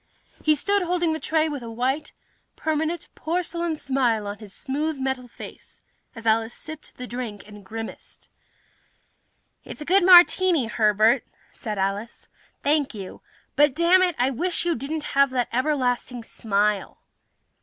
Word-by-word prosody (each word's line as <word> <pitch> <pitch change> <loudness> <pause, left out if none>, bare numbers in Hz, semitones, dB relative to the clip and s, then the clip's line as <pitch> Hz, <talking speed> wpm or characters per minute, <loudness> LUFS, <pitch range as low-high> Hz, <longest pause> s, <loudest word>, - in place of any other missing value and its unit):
He 310 -1 +4
stood 400 +7 +1
holding 350 -2 0
the 315 - -3
tray, 315 0 +1
a 280 -7 -4
white, 260 +6 -1 0.4
permanent 315 +2 -2
porcelain 340 0 -2
smile 250 -7 0
on 205 0 -5
his 210 -3 -11
smooth 295 +7 -2
metal 265 -1 -2
face, - - -12 0.3
as 230 -1 -9
Alice 225 +1 +2
sipped 315 -1 -10
the 250 - -6
drink 235 -5 -6
and 210 -1 -12
grimaced. 225 +3 -9 1.4
"It's - - -9
a - - -5
good 375 +3 +4
martini, 355 -4 +6
Herbert," 220 0 +3 0.3
said 215 -4 -5
Alice. 200 +4 -3 0.3
"Thank 290 -4 +1
you. 195 -3 -8 0.3
But, 295 -2 +4
dammit, 355 +1 +4
I 255 +2 +2
wish 345 +8 -1
you 345 - +2
didn't 295 +4 -4
have 275 0 +5
that 250 -2 -1
everlasting 250 -3 0
smile!" 210 -2 -1
265 Hz, 140 wpm, -24 LUFS, 225-315 Hz, 1.4 s, martini